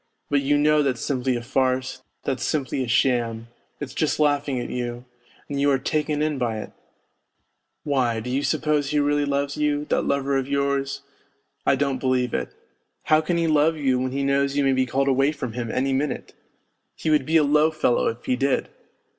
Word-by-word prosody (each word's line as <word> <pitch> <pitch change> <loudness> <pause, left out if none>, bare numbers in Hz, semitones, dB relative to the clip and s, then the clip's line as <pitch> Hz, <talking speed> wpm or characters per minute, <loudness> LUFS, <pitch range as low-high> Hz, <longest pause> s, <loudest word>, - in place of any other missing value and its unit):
But 140 -1 +3
you 145 +1 +2
know 150 +1 +4
that's 130 -4 0
simply 130 -2 0
a 120 - -4
farce, 130 +1 -1 0.2
that's 130 -2 -2
simply 135 -3 -1
a - - -5
sham, 115 -2 +1 0.3
it's 145 -3 -6
just 155 - 0
laughing 145 -3 +1
at 120 - -5
you, 120 0 -4 0.4
and 140 -1 -3
you 145 - +3
are 135 - +3
taken 150 +2 -1
in 150 -3 -1
by 115 -3 -1
it! 110 - -7 1.1
Why, 130 -6 0
do 125 +3 -5
you 135 +2 0
suppose 150 -1 0
he 150 - 0
really 145 0 +1
loves 140 0 -1
you, 150 -1 0
that - - +2
lover 140 0 +1
of 135 -1 -2
yours? 140 -1 -1 0.6
I - - +5
don't 135 -1 -1
believe 125 -2 0
it. - - -2 0.5
How 155 0 +4
can 170 +2 -1
he 170 - +1
love 155 0 +3
you 135 -4 +1
when 130 0 -2
he 140 +1 -2
knows 140 0 +1
you 145 - +3
may 135 -1 +3
be 130 0 +1
called 135 +3 0
away 135 +2 +3
from 125 -6 -5
him 120 -1 -4
any 135 +3 0
minute? 140 +2 -2 0.6
He 160 - -1
would 150 -3 +3
be 160 +1 +4
a 155 - +4
low 150 +2 +4
fellow 155 -6 +1
if 115 +1 -4
he 125 - +1
did 135 +1 0
140 Hz, 205 wpm, -24 LUFS, 130-145 Hz, 1.1 s, I